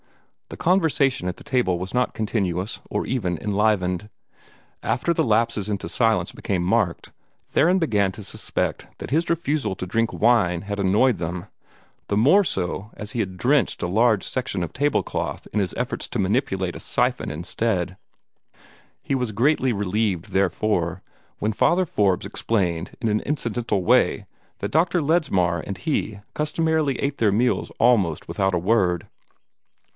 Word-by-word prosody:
The - - -8
conversation 155 - +2
at 90 - -5
the - - -12
table 120 -9 +1
was 95 +1 -5
not 125 0 0
continuous, 100 -3 -2
or - - -1
even 95 -9 -1
enlivened. 105 -1 0 0.7
After 150 +8 +1
the - - +1
lapses 110 -2 +1
into 100 -2 -3
silence 110 -7 +1
became 90 -3 -2
marked, 95 -2 0 0.3
Theron 175 +5 +3
began 105 - +2
to 105 - -9
suspect - - -3
that - - -8
his 165 +4 +1
refusal 150 - 0
to 90 - -5
drink 115 +5 0
wine 105 -7 +2
had 100 0 -4
annoyed 105 +5 +3
them 85 +2 -4 0.6
the 100 - 0
more 155 - +5
so 95 - -3
as 105 -1 -5
he 120 - -4
had 95 -3 -4
drenched 135 +5 +2
a - - +1
large 110 +2 +3
section 125 -7 -2
of 85 - -5
table 145 +2 +1
cloth - - -4
in 105 - +1
his 95 -3 -1
efforts 125 0 -2
to 120 - -3
manipulate 95 -3 0
a - - -7
siphon - - 0
instead. 90 +4 -2 1.1
He - - -2
was 125 -4 -1
greatly 130 +4 +2
relieved, 100 -3 -1
therefore, 95 -2 0 0.3
when 110 +1 -1
Father 180 - +3
Forbes 100 - +1
explained 90 -6 -2
in 115 - -1
an 105 0 +1
incidental 120 -8 -1
way - - +3 0.3
that - - -4
Dr. 170 +3 +2
Ledsmar 140 - +2
and 95 - -5
he 110 - -2
customarily 155 -2 0
ate 140 +1 -2
their 110 -3 +3
meals 120 +5 +1
almost 105 -10 +3
without 95 -1 0
a - - +1
word. 90 -3 +1
105 Hz, 155 wpm, -23 LUFS, 95-130 Hz, 1.1 s, more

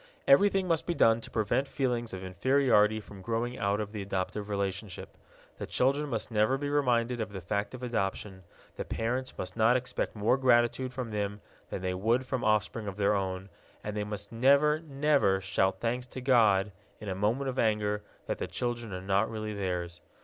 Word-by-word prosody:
Everything 195 +6 +5
must 165 -3 0
be 175 - 0
done 115 -4 +4
to - - -9
prevent 120 +6 0
feelings 120 -5 -1
of 95 0 -6
inferiority 110 +2 +3
from 100 -2 -12
growing 115 +4 -2
out 100 +1 +1
of 105 -1 -4
the 105 -2 -5
adoptive 100 +2 -3
relationship: 100 -1 -4 0.4
the - - -4
children 140 +3 +1
must - - -3
never 110 +4 +2
be 145 +1 -3
reminded 125 -4 +1
of 110 - -4
the 95 - -6
fact 100 +6 -3
of 130 - -10
adoption, 100 -4 -3 0.4
the - - -2
parents 125 +3 -2
must 90 0 -5
not 115 +2 +4
expect 130 -2 -3
more 110 +5 +2
gratitude 125 0 +3
from 125 -3 -5
them 105 -1 -2 0.3
than - - -5
they 90 0 -1
would 115 +7 +1
from 130 -1 -2
offspring 110 0 +1
of 100 0 -5
their 100 0 +3
own, 95 -1 -2 0.4
and 105 0 -4
they 105 - -1
must 105 -1 -6
never, 140 +6 +4
never 140 -10 +2
shout 95 0 0
thanks 125 +2 -2
to 130 - -7
God, 110 -6 +4 0.3
in 105 - -8
a 95 - -1
moment 110 +8 0
of 130 0 -2
anger, 105 -2 +1 0.2
that - - -3
the - - -2
children 120 -3 -3
are 90 0 -5
not 100 +3 +1
really 110 -1 -4
theirs. 90 -3 -3
110 Hz, 195 wpm, -30 LUFS, 100-125 Hz, 0.4 s, Everything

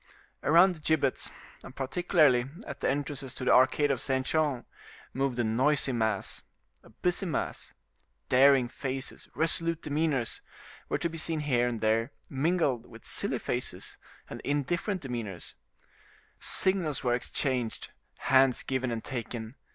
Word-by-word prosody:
Around 170 +5 +6
the 165 - -12
gibbets, 150 -4 +1 0.3
and - - -11
particularly 140 -3 +3 0.2
at - - -7
the - - +1
entrances 140 -1 -3
to 130 - -3
the - - +5
arcade 130 +3 +4
of 130 - -1
Saint 130 -1 0
Jean, 150 -6 0 0.5
moved 135 -2 -1
a 120 - +2
noisy 130 +6 +2
mass, 110 -5 -1 0.4
a - - -18
busy 180 +2 -1
mass; 155 - -3 0.5
daring 135 -1 +5
faces, 135 +1 -5
resolute 165 0 +2
demeanors 145 -5 0 0.5
were - - +1
to - - -1
be 165 0 -5
seen 160 -1 0
here 125 -5 +2
and 115 -2 -3
there, 110 +2 +2 0.2
mingled 140 -4 +1
with 115 -1 -14
silly - - 0
faces - - -3 0.3
and - - -8
indifferent 170 +7 -1
demeanors; 115 -8 -5 0.9
signals 180 -8 +1
were 120 -2 +2
exchanged, 125 -1 -2 0.3
hands 130 -1 +4
given 130 -1 -1
and 115 -1 -3
taken. 120 -2 -5
135 Hz, 140 wpm, -29 LUFS, 120-155 Hz, 0.9 s, Around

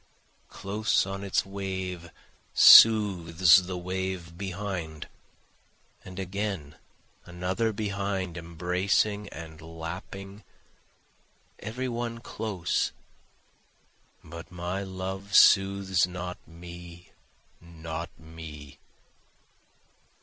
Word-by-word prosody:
Close 105 +1 0
on 95 +1 -5
its 100 -1 0
wave 95 -3 -5 0.5
soothes 95 -4 +7
the 90 -1 -4
wave 90 -1 -4
behind, 90 -4 -5 1.0
And 95 -1 -11
again 95 -5 -4 0.5
another 90 +6 -1
behind 100 -4 -3
embracing 90 +5 0
and 80 -1 -10
lapping, 90 +5 -8 1.2
every 125 +4 -4
one 120 -1 -3
close, 105 -6 -2 1.3
But 85 0 -10
my 90 +2 -4
love 95 +1 -5
soothes 95 -2 +5
not 90 0 -6
me, 85 +1 -12 0.5
not 85 -1 -7
me. 80 -3 -11
95 Hz, 75 wpm, -28 LUFS, 85-100 Hz, 1.3 s, soothes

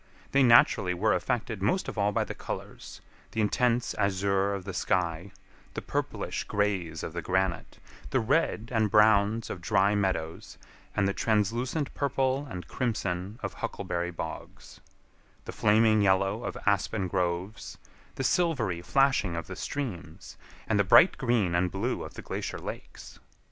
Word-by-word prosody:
They 140 - +4
naturally 115 -7 +5
were 105 +4 +2
affected 115 -4 -2
most 110 - 0
of - - -5
all 105 -1 +1
by - - +1
the - - -6
colors—the 110 - -9
intense 120 +3 +1
azure 100 0 +1
of 95 - -6
the 100 - -5
sky, 90 +1 -1 0.5
the - - -3
purplish - - -3
grays 95 -6 -1
of 80 - -5
the 85 - -3
granite, 95 0 -1 0.3
the 130 - +1
red 120 -2 0
and 110 -2 +2
browns 105 +1 +4
of 90 - -6
dry 100 +2 +2
meadows, 95 -5 -2 0.4
and 100 -1 +2
the 100 - 0
translucent 120 - 0
purple 135 0 0
and 90 -3 -7
crimson 100 -4 -3
of - - -3
huckleberry 85 0 -3
bogs; 85 - -8 0.6
the - - -5
flaming 110 0 +3
yellow 100 +3 +2
of - - -4
aspen 100 -1 +1
groves, 90 +2 -3 0.4
the 135 - -3
silvery 130 - +1
flashing 135 -5 +2
of 85 -1 -4
the - - -8
streams, 95 - -6 0.3
and 105 -2 +1
the - - +5
bright 130 - +6
green 120 -9 +1
and 90 +1 +2
blue 105 +7 -2
of - - -10
the - - -8
glacier - - -4
lakes. - - -9
100 Hz, 150 wpm, -28 LUFS, 95-115 Hz, 0.6 s, bright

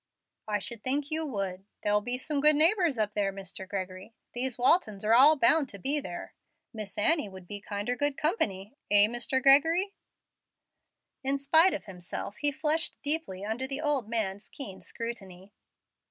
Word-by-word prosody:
"I 210 -1 0
should 220 +2 -4
think 280 +3 0
you 315 0 0
would. 195 -5 -5 0.2
There'll 210 0 +1
be 245 +3 0
some 285 +2 -2
good 300 +1 +7
neighbors 330 - +4
up 210 -1 -1
there, 200 -2 -1
Mr. 195 -1 -9
Gregory; 190 +2 -7 0.2
these 250 0 -1
Waltons 230 - +1
are 220 - +3
all 280 +6 +7
bound 275 +3 +4
to 200 - -7
be 275 +10 +1
there. 285 - -8 0.4
Miss 215 -3 -8
Annie 260 +1 +2
would 190 -2 -13
be 205 +1 -6
kinder 205 +4 -4
good 290 +1 0
company 210 - -2 0.2
eh, 205 0 +6
Mr. 240 +4 -1
Gregory?" 325 +8 +4 1.3
In 270 +1 0
spite 320 +6 +4
of - - -8
himself 190 +2 -7
he 290 -1 +2
flushed 310 +3 -1
deeply 285 - +1
under 230 +5 -2
the 270 +1 -1
old 285 -7 -1
man's 210 -3 -3
keen 200 -9 -5
scrutiny. 200 -4 -8
235 Hz, 170 wpm, -28 LUFS, 205-290 Hz, 1.3 s, good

